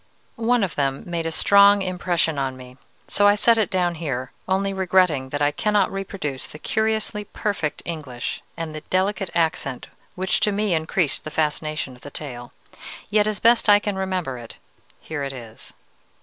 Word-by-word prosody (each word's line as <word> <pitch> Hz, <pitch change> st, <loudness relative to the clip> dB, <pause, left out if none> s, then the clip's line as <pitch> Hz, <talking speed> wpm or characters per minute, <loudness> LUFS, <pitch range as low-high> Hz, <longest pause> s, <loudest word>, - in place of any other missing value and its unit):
One 235 Hz, 0 st, +2 dB
of 190 Hz, -, -1 dB
them 135 Hz, -1 st, -1 dB
made 170 Hz, -2 st, -2 dB
a -, -, -2 dB
strong 200 Hz, +3 st, +6 dB
impression 175 Hz, -4 st, 0 dB
on 130 Hz, -1 st, -2 dB
me, 125 Hz, 0 st, -12 dB, 0.3 s
so 205 Hz, -, +4 dB
I 205 Hz, -, +6 dB
set 230 Hz, +2 st, +4 dB
it 215 Hz, -, +2 dB
down 180 Hz, -2 st, +1 dB
here, 135 Hz, -6 st, -4 dB, 0.2 s
only 195 Hz, +1 st, +1 dB
regretting 180 Hz, -8 st, +2 dB
that 145 Hz, +2 st, -1 dB
I 145 Hz, -, +3 dB
cannot 210 Hz, +4 st, +1 dB
reproduce 190 Hz, -8 st, -4 dB
the -, -, -10 dB
curiously 220 Hz, +2 st, -1 dB
perfect 200 Hz, -8 st, -3 dB
English 140 Hz, -8 st, -5 dB, 0.2 s
and 165 Hz, -2 st, -4 dB
the 155 Hz, -, -6 dB
delicate 190 Hz, +3 st, 0 dB
accent 160 Hz, -6 st, -1 dB, 0.3 s
which 185 Hz, 0 st, +1 dB
to 210 Hz, -, +2 dB
me 205 Hz, -1 st, 0 dB
increased 160 Hz, -1 st, 0 dB
the -, -, -5 dB
fascination 155 Hz, -2 st, -1 dB
of 125 Hz, -, -19 dB
the 145 Hz, -, -9 dB
tale. 125 Hz, -5 st, -7 dB, 0.6 s
Yet, 210 Hz, 0 st, +4 dB
as 210 Hz, -3 st, -1 dB
best 230 Hz, -1 st, +4 dB
I 205 Hz, -, +9 dB
can 205 Hz, -1 st, -2 dB
remember 185 Hz, -9 st, -2 dB
it, 115 Hz, -1 st, -10 dB, 0.5 s
here 155 Hz, -2 st, -5 dB
it 135 Hz, -1 st, -3 dB
is. 115 Hz, -4 st, -11 dB
175 Hz, 180 wpm, -23 LUFS, 145-200 Hz, 0.6 s, I